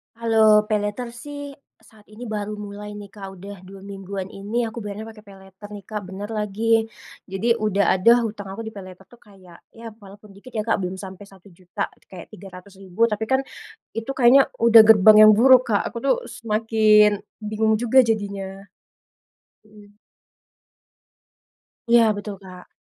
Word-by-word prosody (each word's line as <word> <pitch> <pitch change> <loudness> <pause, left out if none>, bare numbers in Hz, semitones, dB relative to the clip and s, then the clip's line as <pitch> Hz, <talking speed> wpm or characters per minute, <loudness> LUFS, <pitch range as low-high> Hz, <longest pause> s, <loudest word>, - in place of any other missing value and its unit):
Kalau 225 -1 +2 0.2
paylater 210 +3 -2
sih, 290 0 -8 0.5
saat 215 -2 -22
ini 225 +3 -10
baru 210 0 -4
mulai 205 +1 -9
nih, 200 - -11
Kak, 195 -2 -9
udah 200 +3 -10
2 195 0 -13
mingguan 195 -1 -7
ini 205 +4 -5
aku 225 +1 -8
bayarnya 210 +1 -7
pakai 215 -1 -17
paylater 195 +1 -15
nih, 200 - -11
Kak, 210 -1 -4
bener 200 +2 -7
lagi. 210 +1 -5 0.7
Jadi, 195 +4 -3 0.2
udah 200 -1 +1
ada 190 +5 +4
hutang 205 -2 -7
aku 200 +4 -7
di 220 - -8
paylater 185 -1 -12
tuh 240 - -19
kayak, 185 -4 -17 0.2
ya 230 - -12 0.2
walaupun 205 +1 -15
dikit 255 +6 -15
ya, 215 - -1
Kak, 225 - +1
belum 185 +1 -5
sampai 190 +1 -10
RP1.000.000, 185 -2 -12 0.3
kayak 185 - -11
Rp300.000, 190 +2 -4
tapi 220 -1 -3
kan, 265 0 +2 0.6
itu 225 +4 -4
kayaknya 265 +2 +5
udah 230 -1 +7
gerbang 215 -1 +7
yang - - +8
buruk 255 +2 +6
Kak, 205 -2 +1
aku 235 - -8
tuh 275 - +3
semakin 215 -2 +2 0.2
bingung 215 +1 0
juga 240 +3 +3
jadinya. 200 -4 -4 1.0
Mhm. 205 -1 -19 1.9
Iya 235 -1 +5
betul, 205 0 -7
Kak. 180 -1 -13
205 Hz, 155 wpm, -22 LUFS, 195-225 Hz, 1.9 s, yang